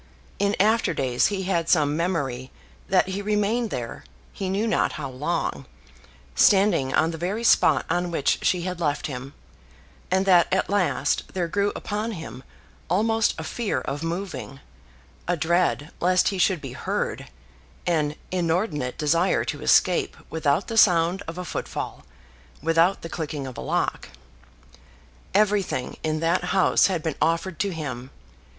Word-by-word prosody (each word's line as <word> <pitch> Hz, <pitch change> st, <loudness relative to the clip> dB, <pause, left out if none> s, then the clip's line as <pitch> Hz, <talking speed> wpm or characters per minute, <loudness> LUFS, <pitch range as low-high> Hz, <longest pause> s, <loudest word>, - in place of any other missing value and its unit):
In 200 Hz, 0 st, +1 dB
after 220 Hz, +4 st, +3 dB
days 125 Hz, -2 st, +2 dB
he 195 Hz, -2 st, -2 dB
had 170 Hz, -3 st, 0 dB
some 150 Hz, -3 st, +3 dB
memory 140 Hz, -7 st, -2 dB, 0.4 s
that 185 Hz, 0 st, +3 dB
he 190 Hz, +2 st, -3 dB
remained 210 Hz, +3 st, 0 dB
there, 120 Hz, -, -5 dB, 0.3 s
he 190 Hz, -, -4 dB
knew 200 Hz, +4 st, 0 dB
not 225 Hz, -, +1 dB
how 140 Hz, -5 st, -5 dB
long, 145 Hz, 0 st, -2 dB, 0.7 s
standing 185 Hz, -, +4 dB
on 160 Hz, +4 st, +2 dB
the 165 Hz, -, -7 dB
very 195 Hz, +7 st, -2 dB
spot -, -, +4 dB
on 175 Hz, 0 st, 0 dB
which 160 Hz, -5 st, +1 dB
she 180 Hz, -2 st, +1 dB
had 180 Hz, -1 st, -4 dB
left 150 Hz, -4 st, -1 dB
him; 135 Hz, 0 st, -6 dB, 0.7 s
and 190 Hz, +1 st, +2 dB
that 180 Hz, -3 st, +5 dB
at 190 Hz, +1 st, +1 dB
last 200 Hz, -4 st, +1 dB
there 175 Hz, -2 st, 0 dB
grew 200 Hz, +4 st, 0 dB
upon 215 Hz, +2 st, -3 dB
him 160 Hz, -8 st, -8 dB, 0.5 s
almost 220 Hz, +5 st, +2 dB
a 160 Hz, -, -5 dB
fear 215 Hz, -, -2 dB
of 145 Hz, +3 st, -4 dB
moving, 170 Hz, -4 st, -5 dB, 0.7 s
a 175 Hz, 0 st, +1 dB
dread 165 Hz, -2 st, +1 dB
lest 185 Hz, +1 st, +3 dB
he 195 Hz, -, -4 dB
should 180 Hz, -3 st, +2 dB
be 135 Hz, -3 st, -7 dB
heard, -, -, -3 dB, 0.6 s
an 150 Hz, -4 st, +1 dB, 0.2 s
inordinate 165 Hz, -, -1 dB
desire 165 Hz, +5 st, +2 dB
to -, -, -4 dB
escape -, -, +3 dB
without 155 Hz, +2 st, +1 dB
the 225 Hz, -, -4 dB
sound 175 Hz, -2 st, +4 dB
of 165 Hz, +2 st, -6 dB
a 180 Hz, -, -5 dB
footfall, -, -, -5 dB, 0.6 s
without 165 Hz, +5 st, +2 dB
the -, -, -4 dB
clicking 150 Hz, -4 st, -4 dB
of 130 Hz, -2 st, -7 dB
a -, -, -6 dB
lock. 65 Hz, -, -2 dB, 1.3 s
Everything 200 Hz, -10 st, +1 dB
in 155 Hz, 0 st, -1 dB
that 170 Hz, +2 st, +1 dB
house 190 Hz, 0 st, +4 dB
had 180 Hz, -5 st, -2 dB
been 160 Hz, -, -1 dB
offered 165 Hz, +2 st, 0 dB
to 200 Hz, -, +1 dB
him. 135 Hz, -6 st, -5 dB
170 Hz, 155 wpm, -24 LUFS, 150-195 Hz, 1.3 s, that